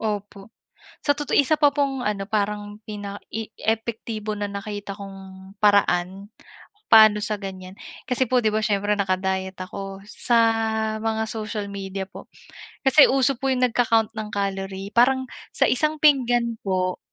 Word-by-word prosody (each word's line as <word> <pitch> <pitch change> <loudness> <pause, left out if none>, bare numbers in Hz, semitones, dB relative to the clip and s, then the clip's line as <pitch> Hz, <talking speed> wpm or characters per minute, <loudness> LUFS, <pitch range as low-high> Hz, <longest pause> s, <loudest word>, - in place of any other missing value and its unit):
Opo 205 -1 -5 0.5
sa 290 - +3
totoo 295 0 -5
isa 285 +2 +4
pa 290 - +7
pong 275 -2 0
ano, 200 -2 -2
parang 205 -1 -2
pina 205 -1 -6
i 225 0 -4
epektibo 220 -1 -3
na 205 -1 -3
nakita 200 0 -6
kong 195 -1 -9 0.4
paraan 195 -1 +2 0.6
paano 215 -1 +8
sa 210 -1 -3
gan'yan, 185 -1 -7 0.4
kasi 255 +1 +1
po 255 - +3
'di 215 -3 +1
ba 215 - +1
siyempre 205 -1 +1
naka-diet 190 -1 -1
ako 195 +1 -7
sa 235 +3 0 0.6
mga 220 0 -1
social 215 -1 -4
media 195 -1 -5
po. 200 - -12 0.6
Kasi 275 +2 +8
uso 270 +1 +2
po 270 -1 0
'yong 255 -1 +3
nagka-ccount 225 -2 +2
ng 215 -1 -5
calorie 195 -1 -3
parang 260 +2 +4 0.3
sa - - +3
isang 305 +4 +1
pinggan 245 -5 +3
po 185 -2 -1
210 Hz, 145 wpm, -23 LUFS, 195-235 Hz, 0.6 s, paano